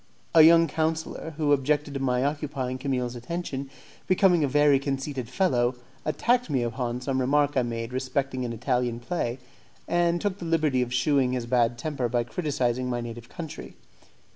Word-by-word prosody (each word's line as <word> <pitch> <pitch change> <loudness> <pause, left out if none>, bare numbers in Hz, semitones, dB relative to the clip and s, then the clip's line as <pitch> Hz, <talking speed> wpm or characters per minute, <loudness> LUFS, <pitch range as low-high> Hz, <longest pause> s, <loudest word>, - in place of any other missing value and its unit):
A 165 - +8
young 165 +1 +7
councillor, 160 0 -2
who 150 -2 +1
objected 145 +1 +1
to 135 - -3
my 125 -1 +1
occupying 140 -3 -3
Camille's 125 -3 -2
attention, 140 +1 -5 0.4
being 185 -3 +4
a - - +2
very 145 0 +4
conceited 135 -3 -3
fellow, 130 -8 +1 0.3
attacked 240 +10 +1
me 130 -4 +1
upon 120 +1 -3
some 130 0 -1
remark 145 +2 +2
I 130 - +4
made 115 0 -4
respecting 130 0 -2
an 120 - -3
Italian 120 0 -1
play, 120 -3 -2 0.5
and 175 0 +2
took 200 0 -2
the 175 - -6
liberty 155 -6 +2
of 125 -1 -2
shewing 130 0 +2
his 125 -2 -2
bad 120 -1 +2
temper 130 -3 -2
by 120 0 +1
criticizing 130 -2 -1
my 120 -1 -1
native 120 0 -7
country. 160 -4 -8
135 Hz, 165 wpm, -26 LUFS, 125-155 Hz, 0.5 s, A